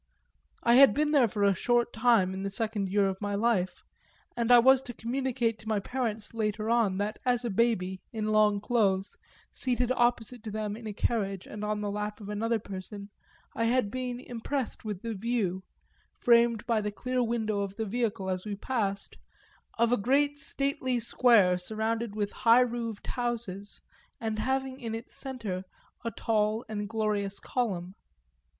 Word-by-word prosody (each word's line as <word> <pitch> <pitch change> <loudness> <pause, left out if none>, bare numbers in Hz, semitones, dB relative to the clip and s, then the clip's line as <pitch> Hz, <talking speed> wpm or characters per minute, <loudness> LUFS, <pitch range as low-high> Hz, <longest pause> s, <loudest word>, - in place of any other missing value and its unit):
I 235 - +5
had 275 0 +8
been 300 +1 +2
there 275 -6 +5
for 205 -1 -2
a 200 -1 +5
short 240 +5 +1
time 225 -5 +3
in 190 - -5
the 195 - -2
second 210 -1 -2
year 200 +1 +3
of 190 0 -4
my 205 -1 -1
life, 200 -4 0 0.5
and 235 0 +1
I 245 - +10
was 260 +2 +6
to 245 -3 -8
communicate 240 -2 -1
to 220 - -13
my 215 -2 +1
parents 225 -1 -3
later 215 0 -1
on 225 -5 +2
that 205 +2 -2
as 245 -1 +1
a 235 - -1
baby 190 -4 +1
in 215 -1 -2
long 210 -1 +4
clothes, 205 -4 +1 0.4
seated 250 -1 +1
opposite 240 -1 +1
to 220 - -5
them 210 -1 -3
in 225 0 -8
a - - -3
carriage 195 -3 -1
and 210 0 -7
on 210 0 -1
the 205 -1 -2
lap 210 +1 -4
of 205 -1 -9
another 225 +3 0
person, 200 0 -8 0.4
I 230 - 0
had 235 -3 +2
been 250 -1 -3
impressed 250 +1 -4
with 210 -3 -5
the 230 -1 -3
view, 205 -3 -1 0.6
framed 235 -1 +4
by 230 -3 +1
the 210 - -2
clear 255 +4 -2
window 225 -3 0
of 200 -1 -3
the 220 - -2
vehicle 215 -2 -2
as 185 -1 -2
we 210 -1 -4
passed, 200 -3 -2 0.6
of 235 0 +3
a 245 - +4
great 285 +6 +2
stately 275 -2 -1
square 225 -6 +4
surrounded 220 +3 -2
with 205 -1 -1
high 235 +2 +5
roofed 235 -3 -2
houses 230 -5 -3 0.4
and 220 -1 -2
having 265 +2 -1
in 230 -3 -4
its 225 - -8
centre 225 -9 -4 0.4
a 230 - -1
tall 215 0 0
and 205 -1 -4
glorious 210 -3 -1
column. 190 -8 -2
225 Hz, 175 wpm, -29 LUFS, 205-240 Hz, 0.6 s, I